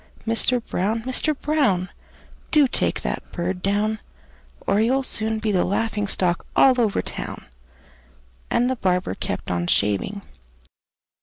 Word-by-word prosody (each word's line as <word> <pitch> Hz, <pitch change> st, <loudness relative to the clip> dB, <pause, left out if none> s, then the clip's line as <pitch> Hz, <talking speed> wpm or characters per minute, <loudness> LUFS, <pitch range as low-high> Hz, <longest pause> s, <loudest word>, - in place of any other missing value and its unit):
Mister 230 Hz, +2 st, +3 dB
Brown! 220 Hz, 0 st, -2 dB
Mister 275 Hz, +4 st, 0 dB
Brown! 265 Hz, -12 st, +1 dB, 0.6 s
Do 300 Hz, -3 st, +5 dB
take -, -, 0 dB
that -, -, -2 dB
bird 180 Hz, +1 st, -3 dB
down, 210 Hz, +3 st, 0 dB, 0.7 s
Or 205 Hz, -, +2 dB
you'll 260 Hz, +4 st, +2 dB
soon 220 Hz, -3 st, 0 dB
be 220 Hz, -1 st, -1 dB
the 185 Hz, -3 st, +2 dB
laughing 205 Hz, +1 st, -1 dB
stock 180 Hz, -3 st, +1 dB
all 255 Hz, -2 st, +5 dB
over 215 Hz, -3 st, +1 dB
town!" -, -, -6 dB, 1.0 s
And 245 Hz, -, +2 dB
the 260 Hz, -, 0 dB
barber 180 Hz, -, 0 dB
kept -, -, -4 dB
on 85 Hz, -1 st, -1 dB
shaving. 105 Hz, -, +1 dB
215 Hz, 135 wpm, -23 LUFS, 185-245 Hz, 1.0 s, Do